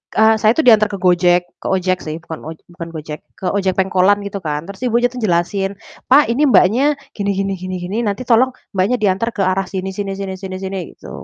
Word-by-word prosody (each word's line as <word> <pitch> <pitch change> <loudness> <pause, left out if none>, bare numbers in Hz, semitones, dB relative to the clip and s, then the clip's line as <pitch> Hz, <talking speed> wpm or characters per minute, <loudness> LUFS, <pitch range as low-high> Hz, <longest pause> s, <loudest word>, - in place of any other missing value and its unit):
eee, 220 0 +5
saya 215 +1 +4
itu 320 - +2
diantar 220 -5 +6
ke - - -3
Gojek 180 -1 +4 0.2
ke - - -5
ojek 185 -1 +1
sih, 155 0 -4
bukan 160 -2 -7
oj 160 0 -7
bukan 170 -1 -8
Gojek, 155 -1 -6 0.2
ke 185 - -3
ojek 195 -2 0
pengkolan 190 +1 +3
gitu 200 0 -5
kan. 150 -1 -2
Terus 200 +1 -10
ibunya 240 +1 +2
tuh 250 - -7
jelasin, 195 +1 0 0.3
"Pak, 265 -2 +5
ini 260 +6 +1
Mbaknya 245 +8 +4 0.2
gini 200 -1 -1
gini 195 0 -1
gini 185 +1 -5
gini, 190 +5 -4
nanti 205 +5 -2
tolong 250 +2 +4 0.2
Mbaknya 190 +6 +2
diantar 200 +3 +1
ke 200 - -1
arah 190 0 0
sini 190 0 -4
sini 195 0 -4
sini 195 -1 -4
sini 190 -1 -6
sini." 190 0 -4 0.2
Gitu. - - -12
195 Hz, 220 wpm, -18 LUFS, 185-215 Hz, 0.3 s, diantar